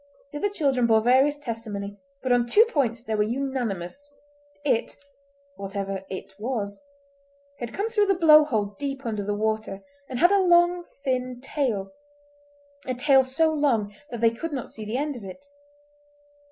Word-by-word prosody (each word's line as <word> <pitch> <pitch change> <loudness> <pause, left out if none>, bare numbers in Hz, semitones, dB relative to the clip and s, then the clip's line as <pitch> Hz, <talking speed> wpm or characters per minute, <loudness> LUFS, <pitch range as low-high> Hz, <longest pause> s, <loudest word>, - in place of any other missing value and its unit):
The 295 - -5
other 410 - +1
children 275 -11 +1
bore 220 -1 +4
various 265 +5 +4
testimony, 215 -6 -6 0.2
but 260 - 0
on 240 -1 +3
two 425 - +6
points 245 - -1
they 225 - -3
were 210 - +1
unanimous—it, 275 +4 -3 0.6
whatever 195 -1 -4
"it" 190 0 -7
was, 210 -3 -3 0.8
had 240 -1 -5
come 410 +3 -2
through 425 -3 +2
the 390 - +3
blow 310 -3 +7
hole 215 -8 -1
deep 275 -1 -4
under 215 -3 -2
the 205 +1 -2
water, 215 -2 -2 0.3
and 255 - -4
had 350 +8 +5
a 400 -1 +4
long, 350 -1 +4 0.2
thin 255 -2 -1
tail—a 285 +3 -6
tail 270 +1 +5
so 315 +5 +1
long 235 -9 +1 0.2
that 235 -4 -6
they 230 -1 +5
could 310 +7 -5
not 260 -4 -4
see 220 - -7
the 220 +4 -2
end 290 +1 -2
of 235 - -9
it. 195 +9 -10
260 Hz, 160 wpm, -25 LUFS, 220-290 Hz, 0.8 s, blow